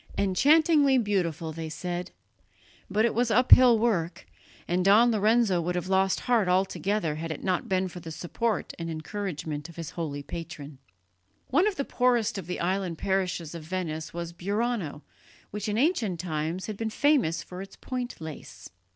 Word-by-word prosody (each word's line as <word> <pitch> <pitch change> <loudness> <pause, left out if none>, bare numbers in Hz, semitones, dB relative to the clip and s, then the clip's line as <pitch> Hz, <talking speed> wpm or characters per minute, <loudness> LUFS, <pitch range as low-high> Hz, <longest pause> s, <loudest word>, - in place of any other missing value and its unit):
"Enchantingly 285 - +4
beautiful," 175 - -1
they 160 0 -5
said. 175 +2 -4 0.8
But 210 +3 +2
it 235 - +1
was 240 0 +1
uphill 250 +1 +7
work, 195 -7 0 0.4
and 180 +1 +1
Don 215 +5 +6
Lorenzo 215 -3 +3
would 175 +2 -2
have 180 +1 -3
lost 190 0 +2
heart 235 -6 +2
altogether 190 -1 0
had 165 +1 -4
it 160 - -6
not 185 -2 -1
been 185 0 +1
for 180 0 -9
the 165 - -9
support 195 +7 -2
and 165 0 -4
encouragement 160 -3 -5
of 170 - -13
his 165 -3 -6
holy 145 -4 -4
patron. 155 -4 -8 0.7
One 335 +10 +3
of 420 - -1
the 280 - -2
poorest 240 -5 +1
of 185 - -9
the 180 - -4
island 180 -1 -1
parishes 185 -4 -1
of 170 - -6
Venice 160 -2 -4
was 170 0 -5
Burano, 200 -4 -2 0.5
which 210 +1 -4
in 210 - -1
ancient 235 - +1
times 160 +1 -3
had 215 -2 -5
been 225 0 -2
famous 250 - +2
for 180 +1 -8
its 195 - -10
point 250 -1 -5
lace. 160 -2 -9
185 Hz, 170 wpm, -27 LUFS, 165-225 Hz, 0.8 s, uphill